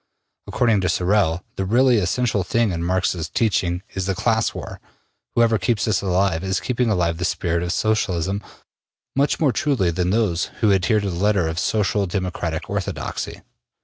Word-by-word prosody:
According 115 -5 +2
to 95 - 0
Sorel, 90 -2 +1
the 95 - -1
really 120 +5 +4
essential 105 +2 0
thing 115 +4 +1
in 85 -1 -3
Marx's 90 -2 0
teaching 90 -3 0
is 95 -1 -3
the 95 - 0
class 110 +3 +1
war. - - -8 0.6
Whoever 115 -2 +3
keeps 120 -4 0
this 110 - +1
alive 95 -2 +1
is 95 0 0
keeping 125 -2 0
alive 85 -5 0
the - - -2
spirit 85 -2 0
of 85 0 -2
Socialism 100 -3 0 0.7
much 140 +2 +1
more 150 -4 +3
truly 135 - +1
than 90 +2 -1
those 100 -5 +1 0.2
who 110 -3 +4
adhere 100 +3 +2
to 100 -2 -2
the - - -4
letter 100 -1 +2
of 80 +1 -2
Social 105 -1 +1
Democratic 90 -3 -3
orthodoxy. - - -4
95 Hz, 170 wpm, -22 LUFS, 90-110 Hz, 0.7 s, really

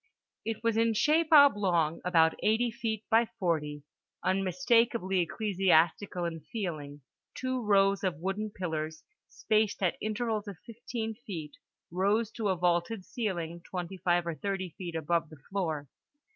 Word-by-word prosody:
It 225 0 -4
was 230 -1 +1
in 230 0 +3
shape 310 +7 +3
oblong, 195 - +5
about 165 -3 +4
80 230 +3 +2
feet 220 -1 -3
by 225 +1 +5
40, 150 -6 -1 0.4
unmistakably 195 +1 +2
ecclesiastical 180 -2 +1
in 165 -1 -3
feeling; 155 - -5 0.3
two 255 0 -2
rows 200 -2 +3
of 180 -3 0
wooden 195 +5 -3
pillars, 160 -5 -4 0.2
spaced 215 -2 0
at 180 - +1
intervals 215 -1 -2
of 200 -4 -7
fifteen 230 -1 -5
feet, 190 - -8 0.4
rose 205 +5 +1
to 215 -3 -2
a 190 - +2
vaulted 175 +3 0
ceiling 175 -7 -3
25 175 -1 -1
or 170 - -2
30 190 +1 -3
feet 170 0 -7
above 165 +1 0
the 155 - -12
floor. 160 -7 -2
195 Hz, 135 wpm, -30 LUFS, 170-220 Hz, 0.4 s, oblong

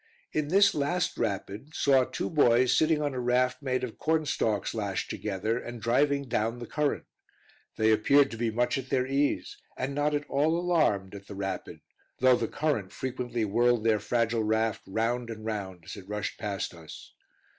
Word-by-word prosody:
In 155 -1 -1
this 200 +4 +5
last 165 +5 0
rapid 110 +6 -4
saw 135 -2 +4
two - - -4
boys 125 -5 +4
sitting 155 -1 +3
on 145 -2 -1
a 130 - -3
raft 125 +2 +1
made 130 -2 -1
of 120 -3 -6
cornstalks 150 -10 0
lashed 100 -4 -3
together, 105 +3 -2
and 120 -1 -7
driving 140 +4 +1
down 115 0 -1
the 120 - -7
current. 150 +3 -1 0.7
They 110 0 +3
appeared 140 +6 +4
to 115 - -6
be 115 0 0
much 120 +4 0
at 130 0 -8
their 130 -1 +1
ease, 140 +2 0 0.2
and 130 +2 -2
not 145 +1 +1
at 145 0 -3
all 155 +4 +2
alarmed 155 - +1
at 100 0 -10
the 100 - -8
rapid, 95 -1 -5 0.4
though 130 0 +5
the 115 -2 -1
current 145 -11 -1
frequently 125 -3 -3
whirled 120 +2 +2
their 110 -2 +3
fragile 115 +2 0
raft 110 +1 0
round 115 +4 -1
and 110 -1 -7
round 95 -6 -5
as - - -7
it 100 -1 -12
rushed 105 0 -4
past 100 -4 -3
us. 80 -2 -12
120 Hz, 180 wpm, -28 LUFS, 110-140 Hz, 0.7 s, this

